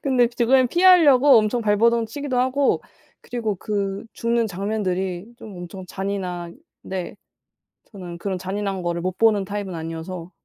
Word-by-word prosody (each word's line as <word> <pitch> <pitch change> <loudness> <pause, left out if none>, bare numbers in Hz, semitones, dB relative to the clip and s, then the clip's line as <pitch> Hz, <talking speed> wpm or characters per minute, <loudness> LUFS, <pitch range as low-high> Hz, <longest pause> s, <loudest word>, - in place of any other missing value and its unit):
근데 255 -3 +3
죽음을 250 +2 +3
피하려고 290 -6 +6
엄청 220 +3 +1
발버둥 225 +2 +2
치기도 275 +2 -3
하고 260 +2 +1 0.4
그리고 225 -4 -3
그 200 +1 -3
죽는 235 0 0
장면들이 190 -2 -2
좀 210 -6 -11
엄청 175 +2 -8
잔인한데 190 - -6 0.8
저는 180 -4 -8
그런 190 +1 -3
잔인한 195 +1 -3
거를 170 0 -2
못 185 +1 -3
보는 215 -3 +3
타입은 200 -2 -4
아니어서 165 +2 -6
205 Hz, 315 characters per minute, -22 LUFS, 185-235 Hz, 0.8 s, 피하려고